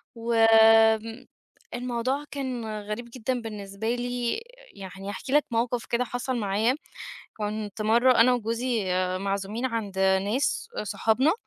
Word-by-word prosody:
والموضوع 230 +3 +2
كان 260 -5 -4 0.2
غريب 215 +4 -6
جدًا 255 0 -2
بالنسبة 215 +1 -4
لي، 245 - -2 0.3
يعني 195 +1 -8
هاحكي 260 +6 -5
لك 295 0 +4
موقف 235 +1 -1
كده 240 +1 0
حصل 245 +2 -3
معايا. 215 +4 +1 0.6
كنت 210 0 -4
مَرّة 235 +3 +4
أنا 250 +2 +6
وجوزي 230 -1 -1 0.3
معزومين 200 +5 -2
عند 215 -6 -4
ناس، 195 - +1
آآ - - -2
صحابنا، 225 +9 +2
230 Hz, 115 wpm, -26 LUFS, 210-245 Hz, 0.6 s, أنا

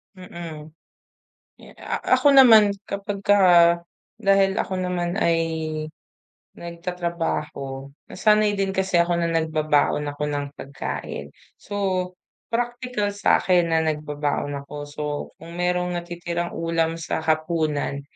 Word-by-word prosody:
Mm. 170 -4 -9 0.9
Eh, - - -15
a - - -4 0.2
ako 290 - +4
naman, 220 -5 +8 0.2
kapagka 200 0 0 0.8
dahil 195 -3 +3
ako 185 -2 -2
naman 180 +1 -2
ay 165 -4 +2 1.2
nagtatrabaho, 170 -6 -4 0.2
nasanay 210 0 +2
din 195 -1 0
kasi 190 -2 +1
ako 170 0 +3
na 170 - 0
nagbabaon 155 -2 +1
ako 145 +1 -5
ng 145 -1 -2
pagkain. 130 - -6 0.3
So, 205 - -7 0.7
practical 240 -3 -2
sa'kin 180 -3 +3
na 160 -1 +2
nagbabaon 150 -2 -2
ako. 150 - -10
So, 145 +1 -8 0.4
kung 165 +1 -11
merong 180 0 0
natitirang 175 0 -4
ulam 165 0 0
sa 160 -1 -3
hapunan, 155 -3 -1
170 Hz, 110 wpm, -23 LUFS, 155-195 Hz, 1.2 s, naman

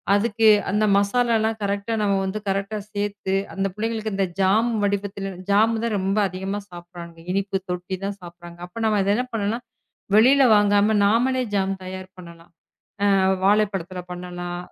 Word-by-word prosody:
அதுக்கு 220 +1 +2 0.2
அந்த 215 +1 +2
மசாலா 230 +4 +2
எல்லாம் 220 0 -1
கரெக்ட்டா 200 +3 -2
நம்ம 200 -1 +2
வந்து 190 +3 -3
கரெக்ட்டா 195 +2 -2 0.2
சேர்த்து 205 -1 -2 0.2
அந்தப் 195 -1 -2
பிள்ளைங்களுக்கு 220 -1 -3
இந்த 195 -1 +1
ஜாம் 220 +5 +3
வடிவத்தில் 200 -1 -2 0.2
ஜாம் 220 +2 +3
தான் 225 -3 0
ரொம்ப 195 +2 -1
அதிகமா 190 +3 -4
சாப்பிடுறாங்க. 175 -1 -11
இனிப்பு 195 0 -1
தொட்டி 180 +1 -3
தான் 200 0 -4
சாப்பிடுறாங்க. 175 0 -12
அப்ப 200 +6 -8
நாம 215 -2 +2 0.2
என்ன 250 - 0
பண்ணலாம், 225 +3 -2 0.5
வெளியில 260 +5 +6
வாங்காம 205 +1 +3
நாமளே 250 +5 +2
ஜாம் 195 -1 +1
தயார் 185 0 -7
பண்ணலாம். 170 -1 -13 0.9
வாழைப் 210 +1 +3
பழத்துல 185 -1 -5
பண்ணலாம். 175 0 -6
200 Hz, 145 wpm, -23 LUFS, 185-215 Hz, 0.9 s, வெளியில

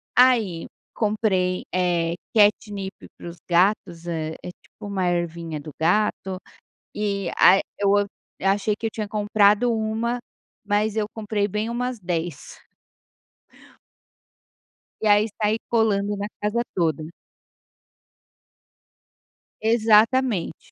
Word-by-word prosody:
Aí 230 -10 +3 0.3
comprei, 205 -4 0
eh, 175 -2 +1 0.2
catnip 205 -2 +2 0.2
para - - -9
os 170 - -11
gatos. 175 -1 +1
É 160 -2 -3
é 180 - -6
tipo - - -12
uma 190 -3 -1
ervinha 170 -2 -2
do 150 +1 -9
gato 190 +2 +1 0.6
e 200 -3 -1
a 195 +1 +7 0.2
eu 200 -1 +3 0.5
achei 200 +2 +1
que 225 - -3
eu 220 - -5
tinha 215 -2 -4
comprado 210 +2 +3
1, 225 +2 -1 0.5
mas 210 +1 +1
eu 215 -1 +1
comprei 210 -2 -1
bem 210 +3 -2
umas 245 0 -3
10. 170 -4 -4 2.5
E - - +2
aí 210 +1 +5
sai 215 +1 +2
colando 205 -3 +1
na 205 +1 -3
casa 210 +3 0
toda. 160 -3 0 2.5
Exatamente. 225 -2 +2
205 Hz, 105 wpm, -23 LUFS, 180-220 Hz, 2.5 s, a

